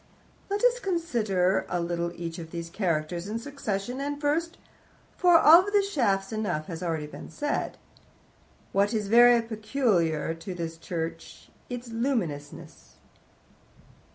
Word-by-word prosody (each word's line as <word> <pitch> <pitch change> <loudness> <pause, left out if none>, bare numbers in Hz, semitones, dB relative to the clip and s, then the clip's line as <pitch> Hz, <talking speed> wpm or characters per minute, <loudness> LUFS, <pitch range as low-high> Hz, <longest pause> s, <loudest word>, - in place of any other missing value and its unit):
"Let 405 +2 -2
us - - +4
consider 215 - 0
a 175 - -1
little 170 0 -2
each 170 0 -6
of 165 -1 -8
these 170 0 -6
characters 170 -1 -1
in 215 +2 -3
succession, 245 -2 -4
and 285 +1 -3
first 320 +4 -1 0.6
(for 355 -2 +6
of 335 +5 +7
the 405 -1 +5
shafts 205 - 0
enough 205 -8 -2
has 165 -4 -6
been 160 -4 -4
said 290 - -2
already), - - -3 0.9
what 200 +3 +2
is 210 -2 -2
very 240 +1 +7
peculiar 215 - 0
to 165 +3 -7
this 165 -1 -5
church 165 0 -6 0.2
its 245 -1 -6
luminousness." 175 - -4
205 Hz, 130 wpm, -27 LUFS, 170-275 Hz, 0.9 s, of